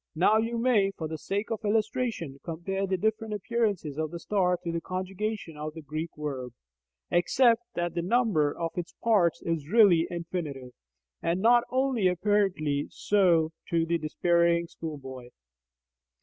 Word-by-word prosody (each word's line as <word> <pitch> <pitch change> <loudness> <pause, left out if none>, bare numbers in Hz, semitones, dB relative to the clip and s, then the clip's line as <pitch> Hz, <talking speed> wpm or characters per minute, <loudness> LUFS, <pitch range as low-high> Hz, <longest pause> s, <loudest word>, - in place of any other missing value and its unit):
Now 190 +6 +4
you 230 +2 0
may, 230 -5 +3
for 160 - -3
the 160 0 -6
sake 200 +7 -3
of 225 - -3
illustration, 210 - -1
compare 190 +4 -3
the 190 0 0
different 220 +2 -1
appearances 205 - -1
of 155 -1 -1
the 170 - -6
star 180 -2 +1
to 170 - -2
the 165 0 -2
conjugation 185 -1 -4
of 155 +1 -5
a - - -6
Greek 155 +3 -4
verb, 135 -5 -5 0.6
except 230 +7 +4
that 175 -1 -1
the 170 - -1
number 185 -7 +2
of 165 +2 -3
its 175 -1 -5
parts 200 -8 +3
is 160 -3 -2
really 190 -6 +5
infinite, 160 -7 -5 0.5
and 170 +2 0
not 240 +3 +5
only 255 -6 +1
apparently 180 -6 +1
so 175 -6 +2 0.2
to 165 -1 +2
the 170 0 0
despairing 170 +2 +2
schoolboy. 135 -7 -8
175 Hz, 150 wpm, -28 LUFS, 160-210 Hz, 0.6 s, really